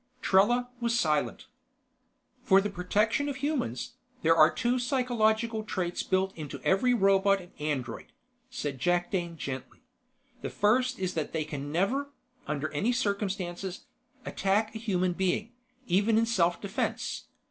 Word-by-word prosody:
Trella 240 +5 +3
was 235 0 +1
silent. 150 - 0 1.0
"For 195 - +6
the 205 +1 -2
protection 210 +9 +1
of 280 - -3
humans, 270 - -2 0.3
there 165 +1 +5
are 155 -1 +7
two 245 +1 0
psychological 235 -3 +1
traits 180 -5 -2
built 190 0 0
into 150 -3 -7
every 195 +7 +3
robot 195 -3 +4
and 175 -1 -13
android," 135 -6 -3 0.4
said 145 - -4
Jakdane 175 +1 0
gently. 130 -3 -6 0.6
"The - - -3
first 250 +5 +2
is 185 -1 -2
that 155 -2 -3
they 160 -1 0
can 145 -1 -5
never, 245 - 0 0.4
under 150 +1 -2
any 205 +11 +1
circumstances, 195 -5 -2 0.4
attack 210 +3 0
a 220 - -5
human 185 -5 0
being, 190 +5 -1 0.3
even 205 +4 +3
in 230 - +4
self 175 -7 +2
defense. 200 +1 -3
195 Hz, 135 wpm, -29 LUFS, 175-230 Hz, 1.0 s, are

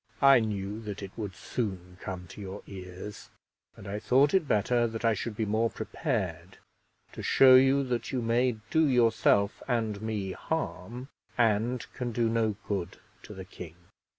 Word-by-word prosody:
I 135 -2 +8
knew 105 -1 -3
that 105 -2 -6
it 95 - -7
would 105 -5 -5
soon 95 -4 -5
come 90 -2 -6
to 105 - -10
your 100 +1 -7
ears, 95 +2 -9 0.5
and 95 - -11
I 100 +2 -3
thought 135 +6 +3
it 185 -6 +3
better 120 +2 +2
that 115 +1 -5
I 115 - +4
should 110 +1 -4
be 110 - -1
more 110 +2 +1
prepared 95 - -3 0.5
to - - -8
show 130 -1 +6
you 135 +2 +6
that 125 -2 -2
you 130 - -1
may 120 +2 +2 0.2
do 160 -1 +4
yourself 115 -5 +3
and 110 -5 -1
me 105 -3 -3
harm, 125 - -4 0.3
and 115 +1 +1
can 125 -1 -3
do 115 0 +1
no 110 -2 +1
good 95 -4 -3 0.2
to 105 - -11
the 95 -1 -8
king. 85 -3 -10
110 Hz, 170 wpm, -29 LUFS, 100-120 Hz, 0.5 s, I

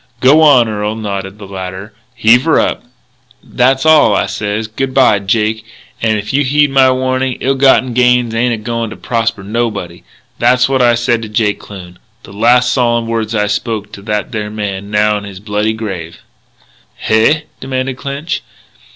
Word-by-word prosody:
"G'wan, 140 -2 +5
Earl," 105 0 -3
nodded 100 -2 -5
the 105 - -10
latter, 95 +2 -7 0.2
"heave 115 +3 +4
her 160 - +3
up." - - -1 0.6
"That's 130 +3 +1
all. 155 -2 +5
I - - +1
sez, 105 +1 -3
'Good 130 +4 -4
bye, 130 -6 +4
Jake. 110 +2 -1 0.4
An' 110 -1 +1
if 105 +3 -5
you 145 +1 +2
heed 145 +1 +2
my 135 -1 +4
warnin', 130 0 -1
ill 135 - +1
gotten 130 -2 +3
gains 125 -1 +2
ain't 120 +2 +1
a - - -7
going 115 +1 -3
to 110 - -8
prosper 115 -4 -2
nobody.' 105 -5 -3 0.4
That's 125 +1 +3
what 135 -1 +1
I 120 -1 +4
said 120 -1 0
to 110 - -7
Jake 105 -1 0
Kloon, 90 -3 -11 0.2
the - - -13
last 125 +4 +3
solemn 120 -2 +1
words 115 -1 -2
I 105 -1 +1
spoke 105 0 -3
to 100 - -10
that 105 0 -3
there 105 -3 -4
man 100 -2 -5
now 105 0 +1
in - - -12
his 100 -2 -9
bloody 105 +1 -1
grave 95 -7 -6 0.5
" - - -34
"Hey?" 115 +8 +2 0.2
demanded 130 0 -3
Clinch. 140 +5 -4
115 Hz, 175 wpm, -14 LUFS, 105-130 Hz, 0.6 s, G'wan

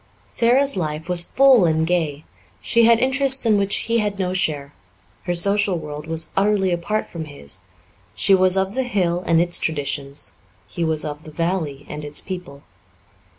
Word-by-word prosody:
Sara's 260 +3 +2
life 155 -3 -4
was 175 -1 +3
full 265 -7 +5
and 160 -1 +1
gay; 160 -4 -1 0.4
she 235 0 +2
had 230 0 +6
interests 265 +1 +1
in 220 -2 +4
which 200 0 +1
he 230 0 +1
had 205 -2 -2
no 185 -1 -2
share; 145 -6 -2 0.5
her 175 0 -1
social 200 +1 +2
world 150 -1 -8
was 165 0 -2
utterly 195 -1 +2
apart 175 +5 -2
from 165 -2 -7
his; 140 - -11 0.5
she 195 - +2
was 185 0 +4
of 190 +1 0
the 265 - -1
hill 185 -8 -1
and 165 -1 +3
its 175 0 +2
traditions, 140 -2 -3 0.3
he 170 - -4
was 160 -2 0
of 150 0 -6
the - - -11
valley 160 -3 -3
and 150 - -7
its 145 0 -2
people. 180 -7 -7
175 Hz, 175 wpm, -21 LUFS, 155-205 Hz, 0.5 s, had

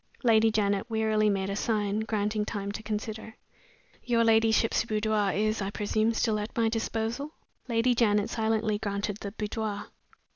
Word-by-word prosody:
Lady 225 -2 +5
Janet 205 0 0
wearily 220 -1 +2
made 195 -1 -1
a - - -2
sign, 210 -1 0
granting 215 -1 -1
time 200 -1 -4
to 210 - -6
consider. 220 +1 -5 0.7
"Your 235 -2 +2
ladyship's 225 0 +3
boudoir 215 -2 0
is, 215 +1 0
I 195 - -2
presume, 215 +2 0
still 220 -2 +1
at 210 +3 -6
my 225 -1 +3
disposal?" 230 +5 -3 0.3
Lady 235 +1 +2
Janet 210 -3 +2
silently 220 -2 0
granted 205 0 -2
the 200 -2 -6
boudoir. 210 -1 -4
220 Hz, 150 wpm, -28 LUFS, 210-225 Hz, 0.7 s, Lady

